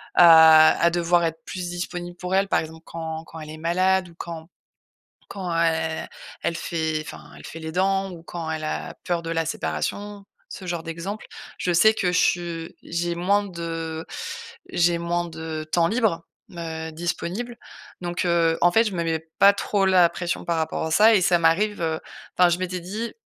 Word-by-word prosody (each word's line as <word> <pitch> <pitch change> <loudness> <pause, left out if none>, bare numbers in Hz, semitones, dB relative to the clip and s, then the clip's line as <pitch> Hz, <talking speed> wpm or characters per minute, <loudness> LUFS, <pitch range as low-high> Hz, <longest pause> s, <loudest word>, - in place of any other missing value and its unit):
à 160 -2 +8
à 170 - +5
devoir 175 0 +2
être 165 0 -2
plus 180 -2 -5
disponible 175 0 -5
pour 180 +1 -2
elle, 195 +1 +3
par - - +3
exemple 160 +1 -10
quand 160 -1 -6
quand 160 0 -11
elle 155 0 -9
est 155 - -8
malade 185 +2 +1
ou - - -16
quand 165 -2 -7 0.8
quand 185 -3 -5
el 160 -1 0 0.4
elle 170 - 0
fait, 160 -2 -2
enfin, - - -10
elle - - -12
fait 165 - -8
les 160 0 -6
dents 195 +2 +1
ou 170 -2 -10
quand 165 -2 -5
elle 155 -1 -3
a - - -4
peur 175 -1 0
de 165 - -5
la 165 -1 0
séparation, 195 - -4 0.2
ce 185 - -8
genre 170 -2 -3
d'exemple. 170 +6 -6 0.3
Je 180 - 0
sais 220 +6 +6
que 185 - -1
je - - +3
su 170 -2 -1
j'ai 170 0 -2
moins 200 +4 +2
de 165 -2 -5 0.7
j'ai 175 0 +2
moins 175 0 -1
de, 160 -1 -6
temps 170 -1 +3
libre, 210 -7 0 0.3
heu, 160 -1 -5
disponible. 175 +8 -4 0.5
Donc, 175 0 -2
heu, 170 -1 +2
en 175 - +5
fait, 225 - +5
je 205 - -2
me 170 - -1
mets 160 -1 -2
pas 200 0 +8
trop 200 -1 0
la 180 -3 +5
pression 170 -1 -3
par 170 -1 0
rapport 160 0 -2
à 160 - -4
ça 215 +6 +6
et 190 - +3
ça 175 -1 +3
m'arrive, 175 +5 +2
heu, 160 -1 -1 0.4
enfin, 180 -1 +6
je 175 +1 0
m'étais 185 -1 -3
dit: 215 +6 -5
170 Hz, 195 wpm, -24 LUFS, 160-185 Hz, 0.8 s, à